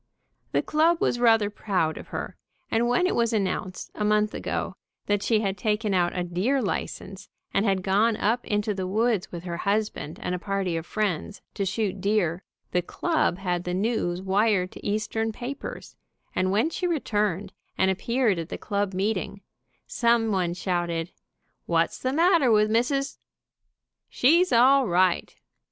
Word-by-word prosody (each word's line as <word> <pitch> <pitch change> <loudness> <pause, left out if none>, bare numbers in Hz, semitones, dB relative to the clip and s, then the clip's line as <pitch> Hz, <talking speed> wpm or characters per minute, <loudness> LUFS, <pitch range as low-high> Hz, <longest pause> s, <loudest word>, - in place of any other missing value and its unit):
The - - +1
club 325 +2 +2
was 240 - +1
rather 225 -3 +4
proud 185 -7 -1
of - - -9
her, - - -5 0.4
and 230 +1 +2
when 245 +10 +2
it 370 - +1
was 235 -1 +1
announced, 190 -3 -2
a 210 - -3
month 210 0 +2
ago, - - -3 0.3
that 205 -1 +1
she 220 0 +2
had 195 -2 -2
taken 210 0 0
out 175 -1 +1
a 180 - 0
deer 185 +11 0
license, 195 -2 -4 0.2
and 200 - +2
had 190 -2 +1
gone 210 +4 +2
up 230 +4 +1
into 210 0 0
the 190 -2 -3
woods 220 0 0
with 170 -1 -7
her 170 -2 -4
husband 200 -5 -2
and 180 - -3
a 180 - -2
party 195 -3 -2
of 165 0 -4
friends, 210 -2 -2
to 200 -2 -2
shoot 195 -1 -2
deer, 195 -4 +1 0.3
the 180 - +2
club 310 - 0
had 180 -2 -2
the 180 0 -2
news 190 -3 -1
wired 195 -1 +2
to - - -12
Eastern 215 +2 -1
papers, 250 +5 -7 0.4
and 185 0 +1
when 220 +11 +2
she 360 - -1
returned 210 - -1 0.2
and 190 0 +3
appeared 230 0 +1
at 165 +1 -5
the - - -4
club 200 -2 -2
meeting, 200 0 -2 0.4
some 235 -2 +2
one 180 -3 0
shouted, 175 -2 -2 0.6
"What's 165 -1 +1
the 260 - -1
matter 330 -3 +4
with 215 0 +4
Mrs.? 275 +5 0 0.9
She's 340 +8 +4
all 260 +2 +5
right 180 0 +2
205 Hz, 165 wpm, -26 LUFS, 185-230 Hz, 0.9 s, all